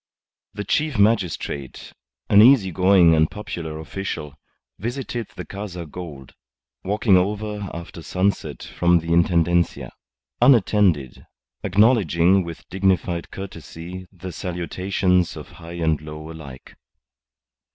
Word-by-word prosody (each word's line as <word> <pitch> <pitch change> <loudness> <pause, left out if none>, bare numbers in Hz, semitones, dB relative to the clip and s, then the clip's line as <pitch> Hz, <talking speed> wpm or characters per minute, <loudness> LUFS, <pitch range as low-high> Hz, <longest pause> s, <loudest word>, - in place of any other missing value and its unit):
The 105 - -3
chief 150 +6 0
magistrate, 95 - 0 0.3
an 100 - +7
easy 115 -5 +6
going 90 -2 +5
and 80 0 +3
popular 85 -6 -6
official, 80 -2 -5 0.5
visited 120 +1 -4
the - - -7
Casa 95 -4 -7
Gould, 75 -5 -9 0.5
walking 105 0 +3
over 105 +1 -2
after 85 0 -8
sunset 95 +4 -1
from 85 0 +2
the 85 0 -4
Intendencia, 85 0 +2 0.5
unattended, 105 - +3 0.4
acknowledging 95 - +3
with 85 -1 -9
dignified 95 -2 0
courtesy 90 -1 -8
the 95 -1 -8
salutations 90 +1 -1
of - - -9
high 85 +1 -9
and 80 -3 0
low 75 +1 -8
alike. 70 -5 -11
90 Hz, 110 wpm, -22 LUFS, 85-100 Hz, 0.5 s, an